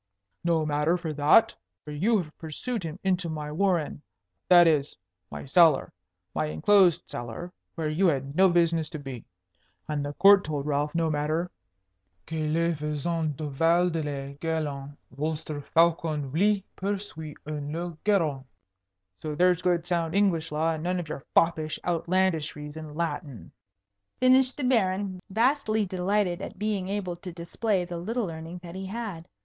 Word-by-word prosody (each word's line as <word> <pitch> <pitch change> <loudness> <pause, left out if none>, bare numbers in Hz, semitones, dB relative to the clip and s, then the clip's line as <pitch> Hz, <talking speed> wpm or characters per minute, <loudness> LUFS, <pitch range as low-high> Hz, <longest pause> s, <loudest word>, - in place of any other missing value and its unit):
"No 165 -2 +2
matter 150 +3 +1
for 165 -3 -4
that; 150 +9 +5 0.3
for 150 - -7
you 200 +10 +2
have 160 -5 -5
pursued 200 - -4
him 165 -1 -5
into 180 -3 0
my 150 -1 -4
warren, 170 -3 0 0.5
that 175 -1 +8
is, 150 -3 +1 0.3
my - - -7
cellar, 160 0 +4 0.4
my 75 -1 0
enclosed 175 - +4
cellar, 120 +10 -7 0.2
where 160 -2 -2
you 165 +5 +2
had 140 -2 -1
no 190 +2 +6
business 170 -2 +2
to - - -6
be. 135 -5 -8 0.6
And 150 -1 -2
the 145 0 -4
Court 195 +4 +7
told 145 -2 -3
Ralph 150 +1 -1
no 165 -1 +1
matter 155 +4 -1 0.7
'que 155 -1 -2
le 170 +1 +2
feisant 150 0 -2
leva 165 +4 +2
hors 180 - +1
de 165 0 -1
le 140 -2 -4
garrein, 145 -3 -3
vostre 150 +1 -3
faucon 160 -3 +1
luy 200 +4 +2
pursuy 190 -6 -4
en 150 -1 -4
le 170 +1 -4
garrein.' 160 -10 +1 0.8
So 150 -1 -4
there's 180 +1 +3
good 175 -2 +1
sound 170 -1 -1
English 175 -6 +2
law, 160 +2 +1
and 160 -1 -3
none 180 +1 0
of 165 -3 -6
your 145 - -6
foppish 160 -2 +2
outlandishries 165 -4 0
in 155 -2 -8
Latin," 145 - -4 0.7
finished 255 +1 +4
the 290 - -3
Baron, 195 -6 +1
vastly 220 0 +2
delighted 185 0 0
at 195 - -7
being 205 -2 -2
able 190 -4 -3
to 180 +1 -8
display 180 +3 -1
the 175 -1 -5
little 225 +6 -2
learning 165 +1 -7
that 170 -1 -8
he 190 +1 -6
had. 200 -6 -5
165 Hz, 160 wpm, -27 LUFS, 150-185 Hz, 0.8 s, that